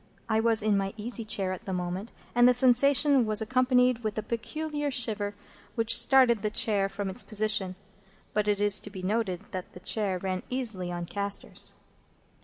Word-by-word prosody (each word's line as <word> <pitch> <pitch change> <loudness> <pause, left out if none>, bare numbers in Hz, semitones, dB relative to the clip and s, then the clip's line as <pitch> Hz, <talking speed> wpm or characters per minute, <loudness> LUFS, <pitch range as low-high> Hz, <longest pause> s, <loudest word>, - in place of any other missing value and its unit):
I 220 -1 +1
was 225 -1 +3
in 210 -2 +2
my 195 +1 -4
easy 230 +2 -2
chair 210 -4 -3
at 185 +5 -7
the 190 - -4
moment, 180 +4 -4 0.2
and 240 +1 +5
the 250 - +3
sensation 265 +2 +4
was 215 -1 +4
accompanied 250 +1 +2
with 215 -1 -3
a 215 - -2
peculiar 295 +6 -4
shiver 215 -5 -2 0.4
which 230 -1 +4
started 250 -4 +5
the 210 - -1
chair 205 -2 0
from 200 0 -5
its 190 - -1
position. 215 -3 0 0.6
(But 210 -1 0
it 205 -1 +1
is 205 -1 +3
to - - -9
be 190 -2 -9
noted 195 -2 -2
that 185 -2 -7
the - - -11
chair 195 0 -1
ran 185 0 -4
easily 220 -9 0
on 175 0 -5
castors.) 200 +2 -3
215 Hz, 185 wpm, -27 LUFS, 195-240 Hz, 0.6 s, and